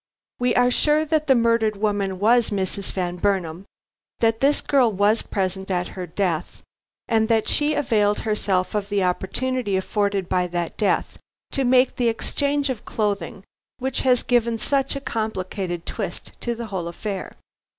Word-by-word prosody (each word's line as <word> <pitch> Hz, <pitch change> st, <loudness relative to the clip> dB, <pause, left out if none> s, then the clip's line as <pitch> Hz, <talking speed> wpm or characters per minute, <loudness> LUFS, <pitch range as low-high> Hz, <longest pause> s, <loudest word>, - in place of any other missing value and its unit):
We 245 Hz, 0 st, +1 dB
are 245 Hz, 0 st, +4 dB
sure 300 Hz, +4 st, +3 dB
that 310 Hz, 0 st, 0 dB
the 265 Hz, -, +6 dB
murdered 230 Hz, -2 st, +2 dB
woman 200 Hz, -2 st, 0 dB
was 230 Hz, +4 st, +3 dB
Mrs. 195 Hz, -1 st, -3 dB
Van 180 Hz, -2 st, -2 dB
Burnam, 185 Hz, -2 st, -1 dB, 0.5 s
that 225 Hz, -1 st, +2 dB
this 280 Hz, +3 st, +3 dB
girl 260 Hz, -5 st, +3 dB
was 205 Hz, +3 st, +2 dB
present 190 Hz, 0 st, -3 dB
at 180 Hz, -1 st, -1 dB
her 180 Hz, -2 st, -6 dB
death, 175 Hz, -1 st, -2 dB, 0.4 s
and 220 Hz, -1 st, +2 dB
that 225 Hz, -1 st, +2 dB
she 300 Hz, +1 st, +2 dB
availed 210 Hz, -7 st, +2 dB
herself 200 Hz, -4 st, 0 dB
of 205 Hz, -1 st, -2 dB
the 200 Hz, -2 st, +1 dB
opportunity 205 Hz, +4 st, -1 dB
afforded 200 Hz, -1 st, -1 dB
by 180 Hz, -1 st, +1 dB
that 175 Hz, -1 st, -3 dB
death 210 Hz, -, 0 dB, 0.3 s
to 275 Hz, -, 0 dB
make 255 Hz, +1 st, +3 dB
the 245 Hz, -2 st, +2 dB
exchange 280 Hz, +4 st, 0 dB
of 240 Hz, -, -6 dB
clothing 200 Hz, -3 st, -2 dB, 0.3 s
which 265 Hz, 0 st, -1 dB
has 250 Hz, -2 st, +3 dB
given 235 Hz, -2 st, +2 dB
such 275 Hz, +4 st, 0 dB
a 275 Hz, -, -4 dB
complicated 190 Hz, -7 st, -3 dB
twist -, -, -5 dB
to 240 Hz, -1 st, -2 dB
the 235 Hz, 0 st, -5 dB
whole 175 Hz, -3 st, -2 dB
affair. 190 Hz, +3 st, -5 dB
210 Hz, 160 wpm, -23 LUFS, 190-245 Hz, 0.5 s, the